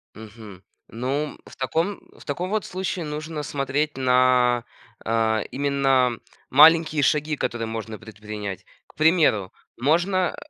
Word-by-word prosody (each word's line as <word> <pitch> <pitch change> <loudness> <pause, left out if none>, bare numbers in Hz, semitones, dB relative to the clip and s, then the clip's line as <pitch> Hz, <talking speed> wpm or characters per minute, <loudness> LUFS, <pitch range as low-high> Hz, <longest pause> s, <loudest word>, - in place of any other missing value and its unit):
Мгм. 105 -3 -12 0.3
Ну, 135 +6 -3
в - - -14
таком 165 +9 -1 0.2
в - - -15
таком 175 +6 -3
вот 215 -1 -1
случае 185 -2 -4
нужно 150 +1 -5
смотреть 145 +1 -2
на, 125 -1 +3 0.4
а, 110 -1 +1
именно 135 -3 +1 0.3
маленькие 155 +1 +6
шаги, 150 +2 +1
которые 120 -3 -3
можно 110 -1 -6
предпринять. 105 -3 -7 0.2
К - - -23
примеру, 155 - +3 0.2
можно, 175 +7 +1
135 Hz, 120 wpm, -23 LUFS, 115-155 Hz, 0.4 s, маленькие